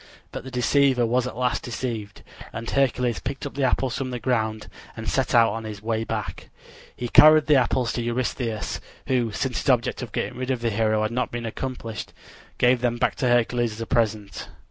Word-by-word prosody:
But - - -6
the 130 - -8
deceiver 130 0 +3
was 125 +2 +1
at 125 - -7
last 125 -1 0
deceived, 115 -4 -5 0.3
and 115 0 -6
Hercules 125 -6 +1
picked 135 - -5
up 145 - -5
the 140 - -2
apples 130 0 0
from 130 0 -3
the 125 - -3
ground 110 -4 -1 0.3
and 115 0 -6
set 130 -2 0
out 115 -3 +5
on 115 0 -5
his 105 -1 -7
way 110 0 -1
back. - - -5 0.5
He 120 - -4
carried 155 +4 +7
the 150 -1 +5
apples 125 -2 +1
to 120 - -2
Eurystheus, 120 -2 -2 0.3
who, 125 -4 +1
since 125 +5 -2
his - - -2
object 125 -1 +2
of 120 -4 -6
getting 125 - -3
rid 130 0 -3
of 130 -3 -1
the 115 -1 0
hero 110 0 +1
had 110 - -1
not 125 +2 -1
been 120 -1 -5
accomplished, 115 -1 -5 0.4
gave 125 0 +3
them 120 -1 0
back - - +1
to 130 - 0
Hercules 120 -1 +2
as 110 - -8
a - - -2
present. 110 -5 -1
120 Hz, 210 wpm, -24 LUFS, 115-130 Hz, 0.5 s, carried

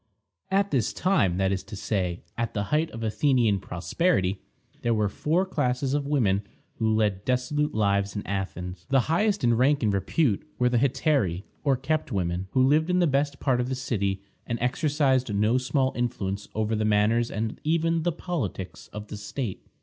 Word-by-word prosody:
" - - -58
At 200 +1 +1
this 125 -6 +1
time, 130 - +2
that 95 0 +1
is 95 -1 -1
to 105 - -8
say, 95 -4 -2
at 115 0 -3
the 100 - 0
height 160 +2 +2
of 115 -5 -7
Athenian 115 -2 +2
prosperity, 95 - 0 0.4
there 120 -1 +1
were 105 -1 +2
four 160 - 0
classes 130 -6 -1
of 145 -1 0
women 110 -10 +2 0.4
who 110 -1 +1
led 105 -3 +1
dissolute 130 +5 0
lives 100 -1 +1
at 100 - -4
Athens. 90 -2 -4
The 135 -1 +4
highest 200 - +1
in 120 - +4
rank 135 +3 +3
and 105 -2 +2
repute 100 - +1 0.2
were 125 -1 +3
the 120 -1 +2
Hetairæ, 130 - +1 0.2
or 140 -3 +2
kept 140 +2 -1
women, 90 -2 -1
who 130 - +4
lived 155 +5 +3
in 180 - +2
the 180 - +4
best 140 -1 0
part 125 -3 +1
of 125 - -3
the 130 - -1
city, 100 -7 -2 0.2
and 120 - -1
exercised 135 -1 +1
no 110 +5 +3
small 130 +1 0
influence 105 -5 -2
over 110 +1 0
the 110 - 0
manners 110 +3 +2
and 110 +1 -3
even 165 +1 +1
the 175 +2 +1
politics 140 - -4
of 105 0 -9
the 105 - -6
state. 105 +1 -5
120 Hz, 190 wpm, -26 LUFS, 100-145 Hz, 0.4 s, The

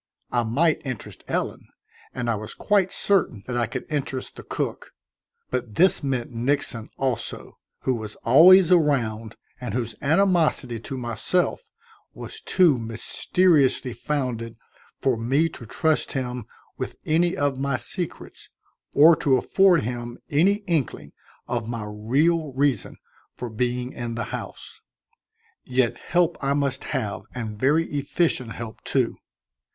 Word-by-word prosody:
I 120 - +2
might 150 +8 +2
interest 130 -6 -7
Ellen, - - -3 0.4
and 125 -2 -4
I 115 - +2
was 110 0 -6
quite 195 -3 +2
certain 175 - +1
that 125 - -4
I 120 -2 +1
could 130 +3 -5
interest 135 -3 -3
the - - -9
cook; - - -4 0.6
but 125 -4 -3
this 185 +2 +4
meant 130 -4 -2
Nixon, 120 -2 -1
also, 130 -4 -3 0.2
who 130 - +1
was 110 -3 -5
always 175 +8 +8
around 115 -10 +2 0.2
and 125 -6 -4
whose 115 -3 -2
animosity 160 -7 +2
to 130 +4 -6
myself 130 - -1 0.5
was - - -9
too 170 -9 +3
mysteriously 130 - +2
founded 120 -4 -3 0.4
for 130 -2 +1
me 135 +8 +2
to 120 -7 -11
trust 160 +7 0
him 125 -4 -3 0.3
with - - -4
any 170 +3 +2
of 140 -2 0
my 140 -1 0
secrets 175 -3 -6 0.4
or 160 +3 +8
to 135 -3 +3
afford 185 +4 +4
him 120 +1 -5
any 195 +8 +3
inkling 160 - -2 0.4
of 120 -2 -2
my 115 -3 -4
real 140 +9 +1
reason 135 -4 0 0.4
for 120 -2 -6
being 125 +2 -2
in 120 -1 -4
the 115 - -2
house. - - -7 0.8
Yet 125 -1 +1
help 175 -1 +1
I 140 0 +2
must 140 -2 -1
have 110 -8 -2
and 110 -4 -5
very 150 +6 +3
efficient 140 -4 0
help, 115 -3 -8
too. - - 0
130 Hz, 135 wpm, -24 LUFS, 120-155 Hz, 0.8 s, always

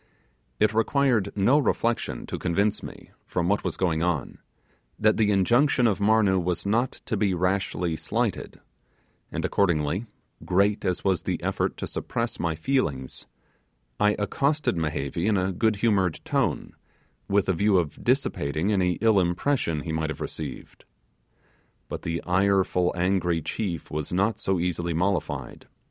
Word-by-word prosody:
It 110 0 +3
required 115 -2 +2
no 120 +9 +4
reflection 120 -4 -1
to - - -5
convince 100 +4 0
me, - - -10 0.2
from 85 -1 -1
what 100 +2 +1
was - - -2
going 80 -4 0
on, 85 -6 -1 0.6
that 110 0 +3
the 110 -2 +3
injunction 120 +7 +3
of 105 -4 +2
Marnoo 100 -2 +3
was 90 +1 -2
not 115 +5 +1
to - - -1
be 95 -2 +1
rashly 90 -2 0
slighted; - - -2 0.7
and - - -2
accordingly, 85 +2 +1 0.4
great 100 +3 +2
as 90 -1 -1
was 95 -4 +1
the - - -2
effort - - -1
to - - -4
suppress 115 -1 -3
my 85 -2 -1
feelings, 80 - -2 0.7
I 105 0 +3
accosted 140 +6 0
Mehevi 80 +2 -2
in 105 -2 +3
a 95 +1 0
good 110 +4 +1
humoured 100 -5 +1
tone, - - -1 0.5
with 100 -1 +2
a 95 - +2
view 100 +3 +3
of 85 -5 -2
dissipating 80 +8 0
any 90 -3 +2
ill 110 -3 +4
impression 85 - 0
he 80 - -5
might 80 0 -1
have 80 - -5
received. - - -7 1.1
But - - -5
the 85 0 -3
ireful, 95 -1 +2
angry 90 -1 +1
chief 90 -4 -4
was 75 -1 -3
not 100 +5 +1
so 95 -2 0
easily 85 -1 -1
mollified. 90 +2 -2
95 Hz, 150 wpm, -26 LUFS, 85-105 Hz, 1.1 s, no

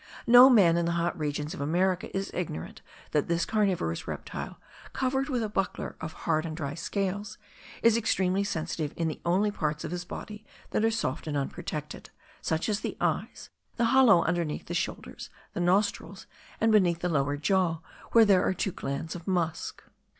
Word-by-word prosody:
No 245 +2 +9
man 185 -9 +6
in 170 0 +1
the 170 - 0
hot 170 0 0
regions 150 +1 -3
of 180 - -6
America 180 +5 +1
is 195 - -3
ignorant 150 - -5 0.3
that 150 - +1
this 170 0 +1
carnivorous 190 - 0
reptile, - - -6 0.4
covered 265 +2 0
with 250 -4 0
a - - -1
buckler 195 -3 -3
of 160 0 -5
hard 155 -1 +2
and 160 -1 -5
dry 140 -4 -3
scales, 200 +5 -3 0.5
is 230 -1 +6
extremely 195 -4 +1
sensitive 160 -5 -3
in 165 - 0
the 155 - -5
only 195 +4 +2
parts 150 -5 -2
of - - -5
his 175 0 -3
body 210 +4 -8 0.3
which - - +1
are 225 - +4
soft 160 - -2
and 145 -1 -1
unprotected, 140 - -5 0.3
such 160 +1 -1
as 210 -2 0
the - - -5
eyes, - - -2 0.2
the 235 - +1
hollow 230 -10 +6
underneath 170 -4 -1
the - - -5
shoulders, - - -4 0.2
the - - -4
nostrils, 195 +2 0 0.3
and 225 0 +3
beneath 175 -5 +3
the 180 - 0
lower 145 -3 0
jaw, 170 0 +1 0.3
where 230 -1 +7
there 195 -3 +5
are 190 - +1
two 195 - -1
glands 140 +1 -4
of 175 -2 -9
musk. 175 -4 -2
180 Hz, 180 wpm, -28 LUFS, 160-205 Hz, 0.5 s, No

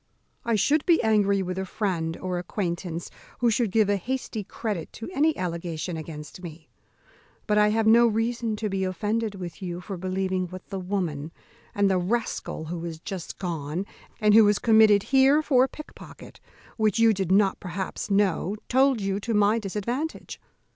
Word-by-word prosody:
I 230 - +1
should 285 +9 +2
be 340 -2 +5
angry 200 -3 +3
with 185 +1 -4
a - - -1
friend 170 -6 -2
or 185 -1 -3
acquaintance 175 -2 -4 0.3
who 240 -1 +2
should 225 0 +1
give 215 +1 +3
a 205 0 +2
hasty 240 0 -4
credit 205 -3 -4
to 225 - -7
any 310 +1 +2
allegation 170 -1 -4
against 155 +1 -8
me; 160 -2 -10 0.8
but 210 -1 +2
I 210 - +5
have 220 +1 +1
no 235 +2 +6
reason 225 0 -1
to 215 0 -3
be 195 -1 -2
offended 210 +3 -1
with 180 0 -8
you 175 -2 -4
for 190 +1 -6
believing 185 0 -2
what 185 +2 -10
the 195 - -4
woman, 175 -6 -3 0.4
and 205 0 +3
the 190 -1 +2
rascal 195 -4 -2
who 165 +1 -5
is 165 -2 -6
just 185 -1 -7
gone, 165 0 -3 0.3
and 210 -2 +4
who 220 -1 +8
is 205 0 +3
committed 220 -3 +5
here 275 +4 +4
for 260 -4 +4
a - - -7
pickpocket, 305 - -12 0.4
which 215 -1 +2
you 225 -1 +5
did 190 -3 -2
not 195 0 +3
perhaps 190 +2 -5
know, 200 -1 +1
told 265 -1 +3
you 195 0 -1
to 225 +2 -2
my 210 +2 +3
disadvantage. 235 - -4
200 Hz, 175 wpm, -26 LUFS, 180-225 Hz, 0.8 s, who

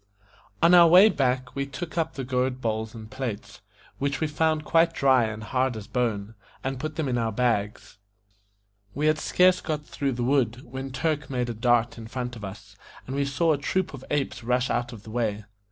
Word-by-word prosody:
ON 170 +1 +6
our 175 -1 +9
way 185 +6 +8
back 130 -5 0
we 140 - -1
took 160 +5 -7
up 165 -1 -1
the 135 - -4
gourd 130 0 -1
bowls 110 -1 -3
and 110 -1 -10
plates, 125 -6 -5 0.4
which 140 0 -1
we 160 - +1
found 155 0 0
quite 165 +1 +3
dry 130 -3 +4
and 110 0 -5
hard 130 0 0
as 105 - -7
bone, 110 -4 -2 0.3
and 135 -1 -3
put 155 +1 -4
them 155 -2 -1
in 125 -2 0
our 115 -1 0
bags. 105 -3 -1 1.0
We 145 +3 -1
had 155 0 +3
scarce 180 +2 +3
got 150 -2 -3
through 140 -2 -2
the 120 0 -3
wood, 125 -2 +1
when 130 +2 -6
Turk 150 +1 -2
made 125 -2 -1
a - - -4
dart 120 0 +1
in 110 - -8
front 125 +1 -4
of 110 - -10
us, 100 +1 -9 0.3
and 130 - -5
we 140 0 +1
saw 155 +4 +2
a 145 - -2
troop 185 +4 -1
of 135 -2 -9
apes 135 -4 -2
rush 125 +2 +1
out 120 0 -1
of 110 -4 -11
the 110 - -10
way. 110 -3 -2
130 Hz, 210 wpm, -26 LUFS, 115-150 Hz, 1.0 s, our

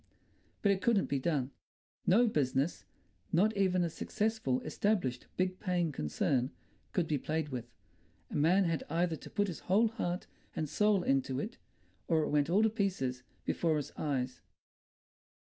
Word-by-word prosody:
But 200 - +5
it 195 -1 0
couldn't 220 -3 +3
be 140 - +1
done. 140 -2 0 0.6
No 225 +7 +6
business—not 140 - -1
even 185 -2 +2
a 170 - 0
successful, 210 - -1
established, 155 - 0
big 185 0 0
paying 180 -5 0
concern—could 125 - -2
be 150 -3 0
played 155 +1 -2
with. 120 -3 -5 0.6
A - - -5
man 170 +7 +4
had 165 -3 0
either 170 0 +1
to - - -11
put 205 -1 +1
his 175 -6 -5
whole 215 +5 +3
heart 180 -6 -3 0.3
and 155 - -1
soul 210 +3 +2
into 135 -2 +1
it, 220 +10 -5 0.5
or 160 -2 +3
it - - -1
went 145 0 +2
all 200 +5 +4
to 220 - +5
pieces 180 - -1 0.2
before 160 -3 +1
his 145 - -4
eyes.... 130 -4 -2
165 Hz, 150 wpm, -33 LUFS, 135-195 Hz, 0.6 s, No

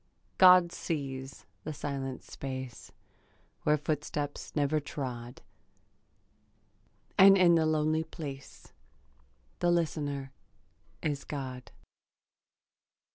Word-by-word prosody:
God 180 -2 +8
sees 135 -5 -5 0.2
the 155 - -4
silent 135 -3 -4
space 130 -3 -7 0.7
Where 150 0 +3
footstep 145 -1 -2 0.2
never 150 +1 +2
trod; 125 -5 -6 1.8
And 195 +1 +9
in 180 -2 +6
the 160 -1 +3
lonely 155 0 +1
place 140 -4 -9 0.9
The 175 - +2
listener 145 -5 -1 0.7
is 145 -2 -1
God. 130 -3 -6
145 Hz, 80 wpm, -30 LUFS, 135-160 Hz, 1.8 s, And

